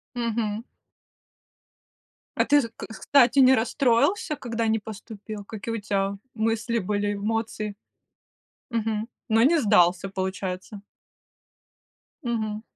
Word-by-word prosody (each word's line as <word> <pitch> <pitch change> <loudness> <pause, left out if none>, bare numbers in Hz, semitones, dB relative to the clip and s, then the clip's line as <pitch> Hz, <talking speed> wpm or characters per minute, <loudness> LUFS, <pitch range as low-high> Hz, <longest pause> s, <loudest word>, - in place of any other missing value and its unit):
Мгм. 230 -2 -1 1.7
А - - +3
ты, 290 0 +5
з 230 - -5 0.3
кстати, 275 -1 +4
не 260 0 +7
расстроился, 260 - +2
когда 230 -4 -2
не 220 0 +2
поступил? 210 -1 -8
Какие 225 +2 -5
у 225 - -4
тебя 200 -1 -1 0.2
мысли 225 +1 0
были, 205 +2 -1
эмоции? 215 0 -2 1.0
Мгм. 225 -1 -1 0.2
Но 225 +1 +4
не 325 +6 +5
сдался, 190 -4 +4
получается? 190 +1 -4 1.4
Мгм. 220 -3 -2
220 Hz, 105 wpm, -25 LUFS, 205-235 Hz, 1.7 s, не